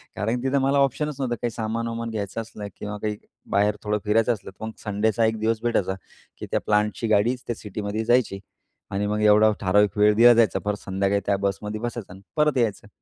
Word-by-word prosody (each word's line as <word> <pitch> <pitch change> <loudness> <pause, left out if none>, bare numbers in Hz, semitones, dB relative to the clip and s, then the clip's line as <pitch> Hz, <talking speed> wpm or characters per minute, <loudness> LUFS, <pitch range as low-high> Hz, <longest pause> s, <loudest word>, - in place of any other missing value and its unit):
कारण 115 +4 -1
तिथं 135 +1 +1
मला 135 +1 +2
ऑप्शनच 140 +2 +1
नव्हतं. 125 -3 -1
काही 120 - 0
सामान-वामान 115 +1 -3
घ्यायचं 110 0 -4
असलं, 105 -2 -8
किंवा 105 0 -6
काही 105 -1 -2 0.3
बाहेर 105 +1 +2
थोडं 105 0 0
फिरायचं 115 +3 +3
असलं. 105 - -9
तर 105 +3 -8
मग 110 - -5
संडेचा 110 +1 +1
एक 110 0 0
दिवस 110 0 0
भेटायचा, 100 -5 0 0.4
की - - -6
त्या - - +2
प्लांटची 105 +2 +1
गाडीच 115 +4 +2
त्या 120 - -2
सिटीमध्ये 105 +1 -4
जायची 120 -5 +2 0.5
आणि 100 +1 -1
मग 105 +1 -1
एवढा 105 +1 +6
ठराविक 100 +1 +2
वेळ 105 0 +5
दिला 120 +2 +8
जायचा. 115 -1 +3
परत 105 0 -1
संध्याकाळी 100 +1 0
त्या 100 -1 +1
बसमध्ये 105 +2 -4
बसायचा 120 -5 -5
आणि 95 - -13 0.2
परत 150 -2 +3
यायचं. 110 -4 0
110 Hz, 200 wpm, -24 LUFS, 105-115 Hz, 0.5 s, दिला